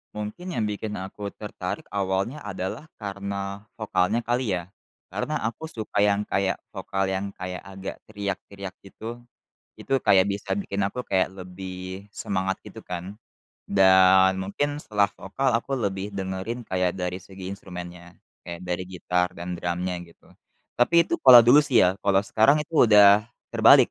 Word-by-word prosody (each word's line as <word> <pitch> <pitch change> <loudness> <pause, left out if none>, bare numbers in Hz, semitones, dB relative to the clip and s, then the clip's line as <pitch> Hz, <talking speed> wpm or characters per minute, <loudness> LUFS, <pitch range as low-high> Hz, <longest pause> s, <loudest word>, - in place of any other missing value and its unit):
Mungkin 105 - -5
yang 115 - 0
bikin 105 0 -3
aku 95 +2 -6
tertarik - - -5
awalnya 100 +7 -1
adalah 100 +5 -5
karena 100 0 -5
vokalnya 110 +1 0
kali, 120 -4 0
ya. 90 +1 -6 0.4
Karena 155 - -2
aku 115 +9 -3
suka 110 -10 -4
yang 100 0 +2
kayak 95 0 0
vokal 95 0 -2
yang 100 +1 -2
kayak, 90 0 -6
agak 95 0 -7
teriak-teriak 100 -2 -6
gitu. 110 +4 -8 0.6
Itu 135 - 0
kayak 95 -2 +5
bisa 100 0 -2
bikin 100 0 -2
aku 125 +5 -5
kayak 95 -1 +1
lebih 95 +1 -8
semangat 95 -1 -2
gitu, - - -10
kan. 90 +2 -6 0.5
Dan 95 -1 +5
mungkin 145 +9 -2
setelah 100 -2 +1
vokal 130 +8 -1
aku 115 +4 0
lebih 100 -2 -2
dengerin 95 +5 -4
kayak 90 -1 0
dari 90 -1 -3
segi 95 0 -8
instrumennya. 90 -2 -9 0.3
Kayak 85 0 -6
dari 90 +1 -2
gitar 90 -1 0
dan 90 +1 -5
drumnya 90 +1 -2
gitu. 85 -1 -19 0.5
Tapi 170 +8 +5
itu - - -1
kalau 130 -6 +10
dulu, 120 +5 +7
sih, 140 -5 +4
ya. 95 +1 +2
Kalau 100 -1 +3
sekarang 135 +9 +3
itu 150 -4 +3
udah 105 0 +7 0.2
terbalik. 115 +3 +6
100 Hz, 150 wpm, -25 LUFS, 95-110 Hz, 0.6 s, kalau